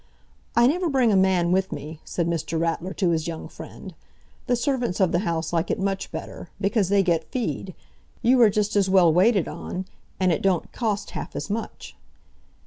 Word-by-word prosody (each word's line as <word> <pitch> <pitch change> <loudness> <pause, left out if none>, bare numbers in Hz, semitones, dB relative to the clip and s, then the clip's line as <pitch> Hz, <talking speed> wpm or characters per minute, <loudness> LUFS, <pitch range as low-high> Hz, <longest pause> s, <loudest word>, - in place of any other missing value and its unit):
"I 235 - +6
never 340 +6 +2
bring 260 -5 +3
a - - +3
man 190 -2 +3
with 190 +1 +1
me," 150 +2 -7
said 170 - -2
Mr. 165 -1 -2
Ratler 165 +2 -1
to 180 -3 +1
his 160 -1 -1
young 165 -1 -5
friend. - - -10 0.5
"The 245 - +3
servants 245 -6 -1
of 190 -3 +3
the 175 - +2
house 165 -3 -2
like 170 0 0
it - - 0
much 195 0 -2
better, - - -7
because 200 -1 +1
they 200 -1 +4
get 170 -3 0
fee'd; 225 -7 -3 0.5
you 250 +2 +5
are 225 - +7
just 210 +1 0
as 195 -2 +3
well 180 -4 +5
waited 195 +1 +3
on, 185 +1 -5 0.3
and 185 -1 +3
it 160 - 0
don't 190 -3 0
cost 215 -4 -2
half - - -6
as - - -4
much." 225 +2 -5
190 Hz, 195 wpm, -24 LUFS, 170-220 Hz, 0.5 s, are